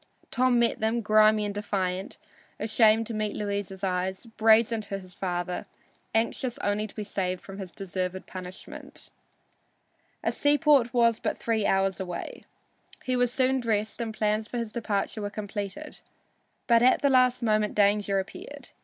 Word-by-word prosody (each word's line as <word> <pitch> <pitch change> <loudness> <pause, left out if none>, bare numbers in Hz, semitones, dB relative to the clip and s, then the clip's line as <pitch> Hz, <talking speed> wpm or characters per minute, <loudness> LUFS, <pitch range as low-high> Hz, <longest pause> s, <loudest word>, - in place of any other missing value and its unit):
Tom 255 -1 +3
met 235 -1 +2
them, 225 +2 0
grimy 215 0 +4
and 205 - -3
defiant, 190 -2 -2 0.4
ashamed 220 +1 +4
to 230 - -6
meet 215 -1 -2
Louisa's 200 -2 -4
eyes, 190 +2 -1
brazen 225 0 +3
to 200 -1 -5
his 185 -2 -12
father, 180 -1 -3 0.5
anxious 235 +2 0
only 205 +1 -1
to - - -16
be 215 - -4
saved 185 -3 -2
from 195 0 -10
his 190 -2 -6
deserved 185 0 -4
punishment. 185 0 -6 1.1
A - - +1
seaport 290 -4 +4
was 230 -2 +3
but - - -2
three 220 -3 0
hours 195 0 +1
away. 180 -2 -6 0.6
He 255 - 0
was 245 -1 +2
soon 260 +1 +2
dressed 220 -1 -1
and 225 -1 -2
plans 215 0 0
for 245 - -5
his 230 -2 -3
departure 215 -2 -2
were 205 - -2
completed. 205 +7 -6 0.7
But 235 -2 +5
at 255 +3 +4
the 280 - +4
last 255 -1 +4
moment 215 -2 +1
danger 205 -1 +3
appeared. 190 0 -6
215 Hz, 155 wpm, -27 LUFS, 195-230 Hz, 1.1 s, But